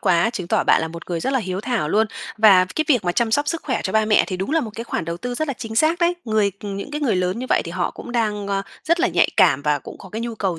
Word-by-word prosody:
quá, 175 +6 +3
chứng 190 -8 -5
tỏ - - +2
bạn - - +4
là 160 - -2
một 170 +2 -10
người 170 -1 -1
rất 265 - -1
là 265 - +2
hiếu 190 -4 -3
thảo 225 -8 -1
luôn 220 +6 +3 0.3
và 200 -4 +7
cái 310 - +1
việc 250 -9 +3
mà 175 - +1
chăm 235 +1 +1
sóc 290 +5 +1
sức 330 +1 -2
khỏe 260 -5 -1
cho 190 - -3
ba 220 0 +3
mẹ 215 -1 +4
thì 185 - -4
đúng 190 +7 -3
là 325 +1 +2
một 230 - -5
cái 230 - -5
khoản 165 - -3
đầu 170 +1 -4
tư 245 +7 -5
rất 310 +4 -2
là 275 - -1
chính 225 -2 -7
xác 315 +6 +3
đấy. 345 0 +2
Người 215 -3 +1
ừm, 200 -1 -5
những 200 +8 -6
cái 300 - -4
người 255 -10 +1
lớn 180 +3 -1
như 255 - -4
vậy - - +3
thì - - -6
họ 180 -1 -1
cũng 240 - -9
đang, 210 -4 -1
a, 195 0 0 0.2
rất 335 +2 +2
là 370 - +3
nhạy - - +3
cảm 140 - +4
và 150 -1 +1
cũng - - -11
có 190 - -12
cái 220 +4 -5
nhu 235 -1 -4
cầu 190 -6 -2
220 Hz, 335 wpm, -21 LUFS, 185-250 Hz, 0.3 s, và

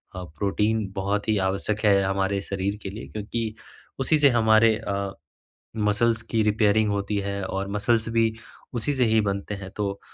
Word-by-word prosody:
अ, 90 - -5
protein 105 +2 0
बहुत 100 +2 -1
ही 110 - +3
आवश्यक 100 +2 -2
है 100 -1 +5
हमारे 95 +1 0
शरीर 100 0 -2
के 95 - -4
लिए 105 - -8
क्योंकि 110 +1 -4 0.5
उसी 135 +4 +3
से 145 -1 +6
हमारे 110 -2 +4
अ, 100 -3 -3 0.6
मसल्स 110 +2 +2
की 115 - +2
रिपेयरिंग 105 0 +3
होती 100 0 -1
है 100 0 -3
और 95 +1 -3
मसल्स 110 +2 +1
भी 115 -1 +3 0.4
उसी 120 +4 -1
से 130 -2 +3
ही 110 -1 +3
बनते 100 0 -2
हैं। 95 -1 -8
तो 100 -1 -2
105 Hz, 170 wpm, -25 LUFS, 100-110 Hz, 0.6 s, से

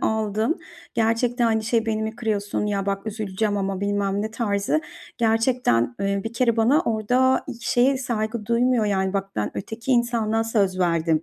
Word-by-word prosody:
aldım. 220 +6 0 0.4
Gerçekten, 235 +2 +1
hani, 220 -1 +2
şey: 225 0 +1
"Beni 220 -1 0
mi 220 +1 -4
kırıyorsun? 210 -3 -1
Ya, 200 -1 -1
bak 195 +1 -2
üzüleceğim 210 -1 -2
ama." 195 -1 -2
bilmem 200 0 0
ne 220 - -3
tarzı 215 +5 0 0.4
gerçekten, 225 - +2
eee, 200 0 0
bir 225 - -4
kere 235 -1 +1
bana 250 +8 +4
orada 250 0 +2
hiç 235 -3 -7
şeye 260 +3 +3
saygı 220 -3 -3
duymuyor, 235 0 +2
yani, 190 -2 0
bak, 195 0 -2
ben 105 - -1
öteki 225 +6 -5
insana 230 -2 +1
söz 200 -5 +1
verdim, 165 -3 +1
220 Hz, 165 wpm, -23 LUFS, 200-235 Hz, 0.4 s, bana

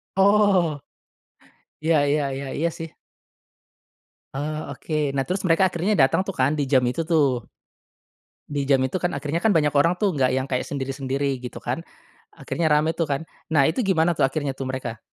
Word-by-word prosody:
Oh. 195 -5 +3 1.1
Iya 165 0 +3
iya 150 +1 +2
iya, 135 +1 -5
iya 165 +3 +1
sih. 165 - -5 1.5
Oh 155 +2 -4
oke. 150 -3 -2
Nah, 135 - +1
terus 185 +6 -2
mereka 175 +2 +3
akhirnya 185 +5 0
datang 140 +2 +3
tuh 195 - -4
kan 130 +2 +2
di 145 -2 -1
jam 130 -2 +3
itu 140 +7 -1
tuh. 140 - +1 1.0
Di 145 -2 -3
jam 135 -2 +4
itu 130 +8 -2
kan 175 -4 -1
akhirnya 150 +4 -2
banyak 165 -9 +2
orang 155 +5 +3
tuh, 200 +1 +1
nggak 135 -5 +1
yang 130 - 0
kayak 130 -2 -2
sendiri-sendiri 135 -1 -2
gitu 125 -1 -8
kan, 125 +6 -2 0.6
akhirnya 160 +2 -1
rame 150 +1 +3
tuh 165 -1 -2
kan. 140 +2 -2 0.3
Nah 145 -3 +5
itu 160 - +1
gimana 175 -6 +2
tuh, 160 - +1
akhirnya 145 0 -2
tuh 135 0 -6
mereka, 130 -3 -4
150 Hz, 175 wpm, -23 LUFS, 135-165 Hz, 1.5 s, Nah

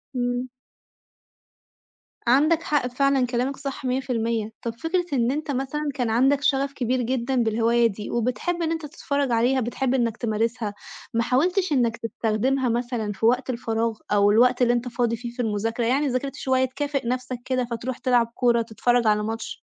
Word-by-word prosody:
إمم. 245 +1 -1 1.8
عندك 310 +6 +4
حق 290 -4 +1
فعلًا 270 0 +2
كلامك 250 +3 -1
صح 275 -1 -6
100%، 235 -4 -1
طَب 230 -1 -3
فكرة 350 +2 0
إن 245 -1 +2
أنت 300 0 -3
مثلًا 280 +3 -2
كان 245 -5 -1
عندك 270 +5 +3
شغف 275 0 +1
كبير 250 0 0
جدًا 255 +2 -1
بالهواية 230 +1 +3
دي، 210 0 -6
وبتحب 250 +9 -1
إن 325 0 0
أنت 325 -2 -3
تتفرّج 280 -2 -2
عليها، 245 +3 +3
بتحب 245 +2 -1
إنك 235 -3 0
تمارسها، 225 -1 -1 0.4
ما 230 +1 +2
حاولتش 355 - +1
إنك 235 -4 +2
تستخدمها 235 +3 0
مثلًا 235 -2 -1
في 215 +3 -3
وقت 250 +2 +2
الفراغ 230 -2 -1
أو 205 0 +4
الوقت 245 +3 +4
اللي 240 0 +4
أنت 240 +1 -1
فاضي 240 -1 0
فيه 235 +1 -7
في 245 +1 -4
المذاكرة، 225 +2 -1
يعني 275 +4 +2
ذاكرت 270 +2 -2
شوية 260 0 +1
تكافئ 275 -1 -3
نفْسك 255 0 -2
كده 255 -2 0
فتروح 240 +2 -3
تلعب 245 -2 +2
كورة، 240 -2 +3
تتفرّج 235 +1 +1
على 210 0 +3
ماتش؟ 225 +1 -4
245 Hz, 170 wpm, -24 LUFS, 230-270 Hz, 1.8 s, عندك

